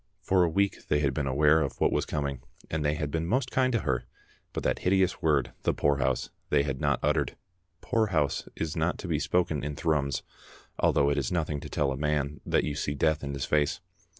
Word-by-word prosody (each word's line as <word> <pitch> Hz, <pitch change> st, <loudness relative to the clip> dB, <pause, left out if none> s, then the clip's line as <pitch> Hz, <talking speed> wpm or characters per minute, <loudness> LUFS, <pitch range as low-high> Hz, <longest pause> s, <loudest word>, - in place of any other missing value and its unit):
For 95 Hz, 0 st, +3 dB
a 85 Hz, -, +2 dB
week 100 Hz, +4 st, 0 dB
they 75 Hz, -, +2 dB
had 70 Hz, -2 st, +1 dB
been 70 Hz, -1 st, -1 dB
aware 75 Hz, +4 st, +4 dB
of 70 Hz, -, -3 dB
what -, -, +3 dB
was -, -, 0 dB
coming, 70 Hz, -4 st, -2 dB, 0.3 s
and 80 Hz, -1 st, -1 dB
they 75 Hz, 0 st, +1 dB
had 75 Hz, -1 st, -3 dB
been 80 Hz, +1 st, -1 dB
most 125 Hz, +5 st, 0 dB
kind 130 Hz, -1 st, +2 dB
to 115 Hz, -, +1 dB
her, 65 Hz, -4 st, -1 dB, 0.5 s
but -, -, -4 dB
that -, -, 0 dB
hideous 95 Hz, 0 st, +2 dB
word, 80 Hz, -3 st, +2 dB
the -, -, +1 dB
poorhouse, 65 Hz, -3 st, +1 dB, 0.2 s
they 70 Hz, -1 st, +3 dB
had 70 Hz, -2 st, -3 dB
not -, -, +2 dB
uttered. 75 Hz, -2 st, +1 dB, 0.5 s
Poorhouse 95 Hz, -, 0 dB
is 80 Hz, +1 st, -3 dB
not 80 Hz, +2 st, 0 dB
to 95 Hz, -, -7 dB
be 80 Hz, -4 st, 0 dB
spoken 80 Hz, -4 st, 0 dB
in 75 Hz, 0 st, -3 dB
Thrums, 75 Hz, -5 st, 0 dB, 0.6 s
though 70 Hz, 0 st, +3 dB
it 70 Hz, -, +1 dB
is 65 Hz, -, -2 dB
nothing 80 Hz, -4 st, -1 dB
to -, -, -8 dB
tell 70 Hz, -2 st, 0 dB
a 65 Hz, -, -3 dB
man 75 Hz, 0 st, -1 dB
that -, -, +2 dB
you 75 Hz, -, -2 dB
see 70 Hz, 0 st, -2 dB
death 80 Hz, +1 st, +1 dB
in 70 Hz, 0 st, -3 dB
his 70 Hz, -, -2 dB
face. 75 Hz, -1 st, +1 dB
75 Hz, 220 wpm, -28 LUFS, 70-85 Hz, 0.6 s, aware